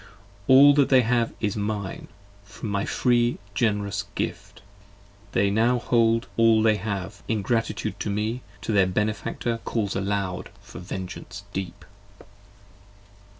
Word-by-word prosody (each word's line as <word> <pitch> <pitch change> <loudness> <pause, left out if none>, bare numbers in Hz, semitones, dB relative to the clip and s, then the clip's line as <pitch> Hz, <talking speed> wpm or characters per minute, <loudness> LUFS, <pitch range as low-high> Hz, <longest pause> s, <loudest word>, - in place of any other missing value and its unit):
All 140 +2 +8
that 140 -1 +3
they 130 -2 +6
have 115 0 +1
is 105 -3 -1
mine: 105 -2 -4 0.4
from 100 +2 -8
my 100 0 -1
free 120 -1 +2 0.2
gen'rous 105 -3 0
gift, - - -5 0.7
They 100 +1 +2
now 115 +4 +3
hold 115 -1 +2
all 115 -1 +5
they 110 -1 +4
have; 100 -1 -5
ingratitude 115 +2 -1
to - - -3
me, 110 +4 -2 0.2
To 115 - -3
me - - 0
their 95 -1 +5
benefactor 110 +4 -2
calls 105 -4 -2
aloud 95 -1 -2
for 100 +1 -11
vengeance 95 +2 -7
deep. 95 -1 -5
110 Hz, 130 wpm, -25 LUFS, 100-115 Hz, 0.7 s, All